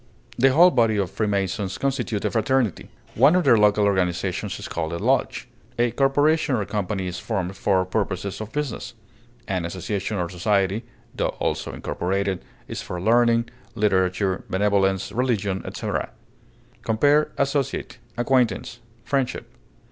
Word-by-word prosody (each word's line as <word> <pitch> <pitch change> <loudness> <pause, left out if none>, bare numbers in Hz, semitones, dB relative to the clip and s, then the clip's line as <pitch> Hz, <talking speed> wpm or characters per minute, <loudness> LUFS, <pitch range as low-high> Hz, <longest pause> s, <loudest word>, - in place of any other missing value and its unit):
The 135 +2 +4
whole 175 +6 +7
body 115 -4 +2
of 95 -2 -1
Freemasons 100 -2 -1
constitute 135 -6 -1
a - - +1
fraternity; 125 -3 0 0.2
one 140 +9 +5
of 180 - +3
their 120 - +6
local 105 0 +4
organizations 95 -3 0
is - - -7
called 80 0 -3
a - - -2
lodge. - - 0 0.3
A 120 0 +2
corporation 145 +3 +2
or 105 -4 -1
company 100 -2 -2
is 90 0 -4
formed 95 -4 -3
for 95 -1 +1
purposes 95 0 -2
of 110 - -7
business; 145 -5 -4 0.5
an 95 -3 -1
association 95 +4 -3
or 90 -2 -1
society 100 +4 0 0.3
(tho - - 0
also - - -2
incorporated) 95 +1 -2 0.2
is - - -5
for 90 - -5
learning, 115 +3 +3 0.2
literature, 95 -2 +1
benevolence, 95 -1 +1
religion, 105 -6 0
etc. - - -3 0.7
Compare 145 +7 +3
ASSOCIATE; 140 -3 -1 0.2
ACQUAINTANCE; 120 -1 +1 0.3
FRIENDSHIP. 135 -3 -1
105 Hz, 135 wpm, -23 LUFS, 95-125 Hz, 0.7 s, whole